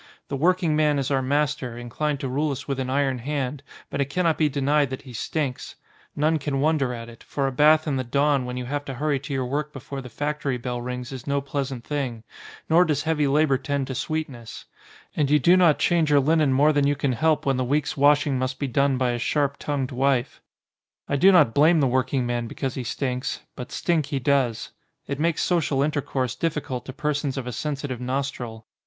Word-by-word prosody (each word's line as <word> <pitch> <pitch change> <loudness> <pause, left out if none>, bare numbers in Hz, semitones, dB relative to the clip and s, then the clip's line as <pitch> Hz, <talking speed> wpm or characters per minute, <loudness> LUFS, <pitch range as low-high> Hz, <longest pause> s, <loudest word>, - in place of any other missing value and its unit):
The - - -2
working 170 +2 +2
man 150 -1 +3
is 135 0 -1
our 135 -1 +2
master, 140 -2 -1
inclined 140 +5 -2
to 135 - -2
rule 145 +4 0
us 135 - -6
with 135 -2 -2
an 130 -1 -2
iron 135 -1 +1
hand, 140 +1 -3 0.3
but 140 - -1
it 140 - -1
cannot 165 +1 +1
be 155 -2 +2
denied 140 0 +1
that 130 - -6
he 130 -3 -11
stinks: 135 +2 -3 0.4
none 155 +2 +2
can 140 -1 -2
wonder 145 -3 +2
at 115 -1 -6
it, 115 -1 -13
for 140 - -3
a 135 - 0
bath 155 +4 +5
in 145 -4 -1
the 130 - -1
dawn 140 +2 +2
when 125 0 -5
you 125 - -4
have 145 +3 -3
to 135 - -5
hurry 145 +1 0
to 140 - -9
your 135 -2 -1
work 145 +4 -2
before 135 0 -7
the 125 - -9
factory 145 0 -2
bell 125 0 -4
rings 125 0 -5
is 130 -1 -8
no 140 0 +1
pleasant 135 -3 -4
thing, 130 -6 -3 0.4
nor 165 +3 +5
does 155 -5 0
heavy 155 -2 +1
labour 140 -1 +3
tend 140 0 -2
to 130 - -5
sweetness; 135 -4 -5 0.5
and 145 -3 +1
you 150 - +5
do 170 +6 +5
not 175 -5 +5
change 170 -3 +2
your 145 -1 +5
linen 155 0 +3
more 145 +4 +4
than 145 -1 +2
you 145 - +2
can 135 -2 0
help 155 +6 +1
when 135 -2 +1
the 130 - 0
week's 145 +3 0
washing 145 -1 +3
must 130 0 -2
be 140 - -2
done 135 +1 +2
by 125 -1 +1
a 120 - -2
sharp 140 +3 0
tongued 140 -3 -2
wife. 130 0 0 0.7
I 140 - 0
do 190 +8 +6
not 150 -11 +5
blame 155 +5 +5
the 140 - +3
working 130 0 +1
man 120 -1 -2
because 135 +2 -4
he 130 - -4
stinks, 125 +1 -3
but 125 - -8
stink 160 -5 0
he 140 - -2
does. 130 -3 0 0.3
It 140 0 -4
makes 165 0 +1
social 150 -6 +1
intercourse 140 -4 -1
difficult 150 -6 -3
to - - -4
persons 145 -1 -2
of 130 - -3
a 125 - -4
sensitive 140 -2 -4
nostril. 125 -4 -4
140 Hz, 220 wpm, -24 LUFS, 130-150 Hz, 0.7 s, do